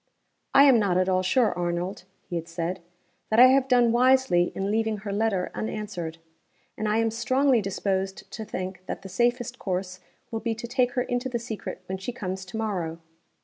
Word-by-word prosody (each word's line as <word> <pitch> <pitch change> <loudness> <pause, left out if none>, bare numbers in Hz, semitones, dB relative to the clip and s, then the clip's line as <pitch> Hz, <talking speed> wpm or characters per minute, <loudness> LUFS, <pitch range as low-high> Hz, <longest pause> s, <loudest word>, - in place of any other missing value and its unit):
"I 275 - +9
am 265 -5 +7
not 195 -4 +2
at 185 0 +2
all 185 -1 +2
sure, 225 +5 +2
Arnold" 175 +2 -3 0.2
(he 175 - -5
had 165 -1 -3
said), 170 +2 -3 0.5
"that 220 - +3
I 255 +1 +10
have 265 0 +3
done 245 -3 +4
wisely 250 -7 +4
in 195 +1 -1
leaving 220 0 0
her 205 -1 -4
letter 205 -3 0
unanswered. 200 -7 -4 0.6
And 215 - -2
I 215 - +2
am 225 0 +2
strongly 255 +2 +2
disposed 195 0 -2
to 220 - -5
think 185 -3 -5
that - - -5
the 195 - -8
safest 240 +4 0
course 185 -1 -3 0.3
will 225 - -2
be 225 0 -2
to 235 +2 -7
take 245 0 +1
her 250 - +1
into 245 +1 -2
the 245 - -1
secret 220 -5 -6
when 190 +1 -4
she 195 +6 -4
comes 190 -5 -5
to 185 +4 -7
morrow. 180 -7 -2
210 Hz, 195 wpm, -26 LUFS, 185-240 Hz, 0.6 s, I